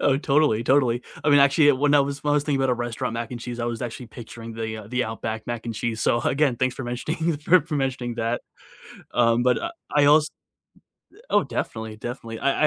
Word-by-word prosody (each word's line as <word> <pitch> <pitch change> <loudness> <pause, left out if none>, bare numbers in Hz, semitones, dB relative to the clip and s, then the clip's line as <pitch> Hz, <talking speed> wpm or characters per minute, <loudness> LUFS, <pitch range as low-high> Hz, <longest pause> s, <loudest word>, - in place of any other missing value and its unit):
Oh, 135 - +3
totally, 140 -6 +2
totally. 125 -3 +3 0.2
I 150 - +2
mean, 145 - +7
actually 140 +2 +5
it 130 -3 +4
when 145 +1 +3
I 145 - +6
was 140 +1 -2
when 145 - +2
I - - +3
was 145 - +2
thinking 140 -3 0
about 135 -1 +2
a - - +3
restaurant 120 -1 -3
mac 115 0 -4
and 120 -1 -6
cheese, 120 0 -6
I - - -1
was 120 0 -3
actually 120 +1 -6
picturing 115 0 -10
the, 110 -1 -4
uh, 105 - -10
the 125 +1 0
Outback 110 0 -5
mac 120 -1 -4
and 115 - -3
cheese, 115 0 -3
so 120 +2 +2
again, 135 -2 +1
thanks 130 0 0
for 130 - -6
mentioning 155 +7 -2
for 165 +5 +4
for 150 +1 -6
mentioning 130 -3 -2
that, 115 +1 -1 0.7
um, 120 0 +3
but, 125 0 +3
uh, 335 - -4 0.2
I 145 -1 +5
als 150 +1 +5 0.8
th 440 - -19
oh, - - +3
definitely, 110 -1 -4
definitely, 115 -1 -6
I 140 +2 +1
125 Hz, 235 wpm, -24 LUFS, 115-145 Hz, 0.8 s, mean